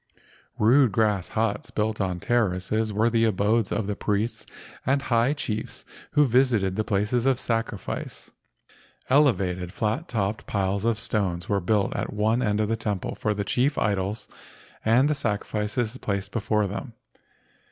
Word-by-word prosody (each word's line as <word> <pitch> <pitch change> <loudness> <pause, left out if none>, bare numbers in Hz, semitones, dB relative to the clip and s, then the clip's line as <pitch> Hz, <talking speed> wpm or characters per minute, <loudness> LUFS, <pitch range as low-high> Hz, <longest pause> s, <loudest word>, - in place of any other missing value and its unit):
Rude 125 +3 +5
grass 105 -3 +1
huts 110 -2 -1
built 110 0 -1
on 90 -2 -1
terraces 110 0 0
were 110 +3 +2
the 115 0 +3
abodes 110 +1 +1
of 110 - -1
the 105 0 -2
priests 105 +4 -2 0.4
and 135 +2 +2
high 120 0 +2
chiefs 110 -7 -4 0.3
who 150 - +5
visited 115 -7 +2
the 110 - 0
places 110 +4 0
of 130 -2 +3
sacrifice. 115 -3 -3 0.8
Elevated, 95 - +2
flat 110 - -2
topped 105 -1 -2
piles 100 +1 -1
of 115 -2 +2
stones 95 -5 -1
were 100 -1 +1
built 100 +2 +1
at - - -2
one 110 +3 +1
end 105 -3 +1
of 105 - +1
the 115 - 0
temple 105 -4 -3
for 105 -1 -1
the 100 0 -2
chief 130 +8 +1
idols 100 +1 -1 0.6
and 120 +5 +4
the 150 - +2
sacrifices 110 -2 -2
placed 100 -1 -3
before 105 -1 0
them. 115 +6 -5
110 Hz, 150 wpm, -25 LUFS, 100-115 Hz, 0.8 s, Rude